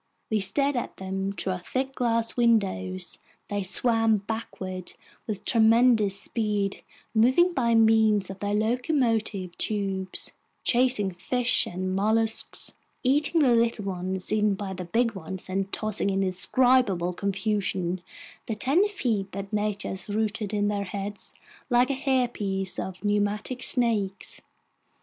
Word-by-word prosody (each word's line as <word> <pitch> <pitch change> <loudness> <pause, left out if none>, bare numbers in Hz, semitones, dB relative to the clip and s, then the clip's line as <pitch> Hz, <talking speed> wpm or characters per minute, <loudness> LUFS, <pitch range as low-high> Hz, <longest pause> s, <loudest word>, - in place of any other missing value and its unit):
We 215 - +2
stared 275 +9 +2
at 245 - -4
them 190 +1 -3
through 190 -1 -2
our 185 - -5
thick 265 +8 -3
glass 230 -2 0
windows: 195 - 0 0.3
they 205 0 -1
swam 225 +3 +3
backward 195 -3 -6 0.3
with 210 -3 -5
tremendous 225 -3 +4
speed, 205 -3 -2 0.3
moving 260 +11 +4
by 235 -6 +2
means 220 -3 +4
of 195 - -10
their 205 0 -1
locomotive 225 - 0
tubes, 195 -3 -1 0.3
chasing 245 -5 +3
fish 245 +7 +1
and 185 +1 -3
mollusks, 220 +3 0 0.3
eating 295 +5 +3
the 250 -3 +4
little 230 -3 +1
ones, 185 0 -2
eaten 210 -2 +2
by 195 -1 -5
the 180 -1 -6
big 230 +6 +1
ones, 190 0 -7
and 195 +1 -2
tossing 215 -2 0
in 195 0 0
indescribable 190 -1 +2
confusion 195 -2 -1 0.5
the 220 - -2
ten 280 - +3
feet 225 - -2
that 195 +1 -6
nature 210 -1 -1
has 190 +2 -6
rooted 215 0 -1
in 205 -1 0
their 205 -1 -1
heads 200 +2 -6 0.4
like 245 +2 +3
a - - +1
hairpiece 240 -8 0
of 190 +1 -6
pneumatic 205 +4 -1
snakes. 220 -7 0
210 Hz, 135 wpm, -26 LUFS, 195-235 Hz, 0.5 s, tremendous